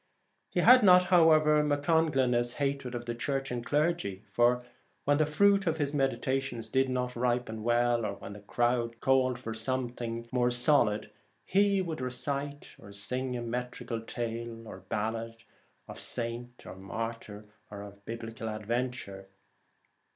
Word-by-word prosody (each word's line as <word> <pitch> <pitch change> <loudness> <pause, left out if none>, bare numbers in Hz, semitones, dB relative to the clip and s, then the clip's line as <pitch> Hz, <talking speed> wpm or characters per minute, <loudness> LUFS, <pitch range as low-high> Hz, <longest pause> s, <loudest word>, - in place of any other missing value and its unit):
He - - 0
had 255 0 +8
not, 180 -3 +7
however, 155 -3 +6
MacConglinne's 145 -5 +2
hatred 140 -2 -2
of 120 0 -5
the 120 - -3
Church 135 +3 -2
and 120 -1 -3
clergy, 145 - 0
for 120 +3 +3 0.4
when 145 +1 +3
the 155 - +3
fruit 200 +5 +3
of 160 -1 +1
his 145 -2 -1
meditations 135 -4 -1
did 130 +2 +2
not 125 -1 -2
ripen 120 -2 -1
well, 120 +1 +2
or 100 - -2
when 100 - -9
the 105 - -10
crowd 120 +2 0
called 130 -1 +2
for 115 -2 -6
some 130 +2 -2
thing 115 -1 -5
more 125 -1 +2
solid, 120 -3 +2 0.3
he 200 0 +3
would 160 -5 -4
recite 140 +3 -4
or 100 - -12
sing 125 +5 -3
a 120 - -4
metrical 120 -1 -4
tale 115 0 -5
or 95 - -9
ballad 115 +3 -4 0.4
of - - -9
saint 120 +1 -5
or - - -8
martyr 105 +2 -6 0.2
or 100 -1 -8
of 100 0 -12
Biblical 115 0 -6
adventure. 110 -2 -3
120 Hz, 150 wpm, -30 LUFS, 115-140 Hz, 0.4 s, had